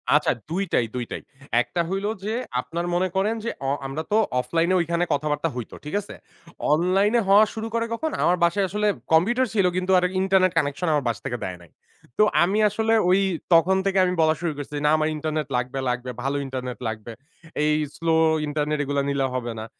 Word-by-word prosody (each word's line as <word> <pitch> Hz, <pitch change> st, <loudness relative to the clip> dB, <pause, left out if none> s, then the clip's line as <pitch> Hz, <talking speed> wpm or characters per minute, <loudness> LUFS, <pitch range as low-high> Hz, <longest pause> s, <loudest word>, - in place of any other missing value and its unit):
আচ্ছা, -, -, +3 dB, 0.2 s
দুইটাই, 175 Hz, -8 st, 0 dB
দুইটাই। 120 Hz, -2 st, -4 dB, 0.4 s
একটা 170 Hz, +8 st, -2 dB
হইল 195 Hz, +1 st, -2 dB, 0.2 s
যে, 215 Hz, -, -2 dB, 0.3 s
আপনারা 170 Hz, +5 st, -4 dB
মনে 185 Hz, +2 st, +2 dB
করেন 210 Hz, +4 st, +1 dB
যে -, -, 0 dB, 0.2 s
অ -, -, +1 dB, 0.2 s
আমরা 145 Hz, +4 st, -4 dB
তো -, -, +3 dB, 0.2 s
অফলাইন 165 Hz, +6 st, 0 dB
এ -, -, +4 dB
ঐখানে 170 Hz, +1 st, 0 dB
কথাবার্তা 150 Hz, +2 st, -1 dB
হইত। 120 Hz, -3 st, -6 dB
ঠিক 150 Hz, -, -4 dB
আছে? 200 Hz, -, -11 dB, 0.6 s
অনলাইন 185 Hz, +6 st, +2 dB
এ -, -, +2 dB
হওয়া 205 Hz, +2 st, +7 dB
শুরু 225 Hz, 0 st, -4 dB
করে 230 Hz, 0 st, +1 dB
কখন? 315 Hz, +7 st, -2 dB
আমার 180 Hz, -, +3 dB
বাসায় 190 Hz, +3 st, +2 dB
আসলে 210 Hz, +2 st, 0 dB, 0.3 s
কম্পিউটার 240 Hz, +11 st, +3 dB
ছিল, 200 Hz, -4 st, +3 dB
কিন্তু 185 Hz, +1 st, 0 dB
আর 180 Hz, -, -3 dB, 0.2 s
ইন্টারনেট 190 Hz, -1 st, +3 dB
কানেকশন 150 Hz, +3 st, 0 dB
আমার 145 Hz, -3 st, +1 dB
বাসা 120 Hz, -, -2 dB
থেকে 120 Hz, -, -2 dB
দেয় 90 Hz, -1 st, -4 dB
নাই। 85 Hz, -, -18 dB, 0.5 s
তো -, -, +6 dB, 0.2 s
আমি 195 Hz, +5 st, +1 dB
আসলে 225 Hz, +2 st, 0 dB, 0.2 s
ওই 185 Hz, +2 st, +5 dB, 0.3 s
তখন 170 Hz, +3 st, +5 dB
থেকে 195 Hz, 0 st, +1 dB
আমি 180 Hz, -, 0 dB
বলা 155 Hz, 0 st, +3 dB
শুরু 170 Hz, -2 st, 0 dB
করছি, 145 Hz, +1 st, -6 dB
না -, -, +5 dB
আমার 155 Hz, 0 st, +1 dB
ইন্টারনেট 155 Hz, 0 st, -2 dB
লাগবে, 125 Hz, +2 st, -3 dB
লাগবে, 125 Hz, +1 st, -3 dB
ভালো 140 Hz, +1 st, -1 dB
ইন্টারনেট 130 Hz, -2 st, -5 dB
লাগবে। 110 Hz, +1 st, -5 dB, 0.5 s
এই 150 Hz, 0 st, +3 dB, 0.2 s
স্লো 165 Hz, -1 st, 0 dB, 0.3 s
ইন্টারনেট 150 Hz, 0 st, -1 dB
এগুলা 140 Hz, 0 st, 0 dB
নিলে 140 Hz, -1 st, 0 dB
হবে 120 Hz, -2 st, -3 dB
না। 110 Hz, -, -5 dB
165 Hz, 195 wpm, -24 LUFS, 140-190 Hz, 0.6 s, হওয়া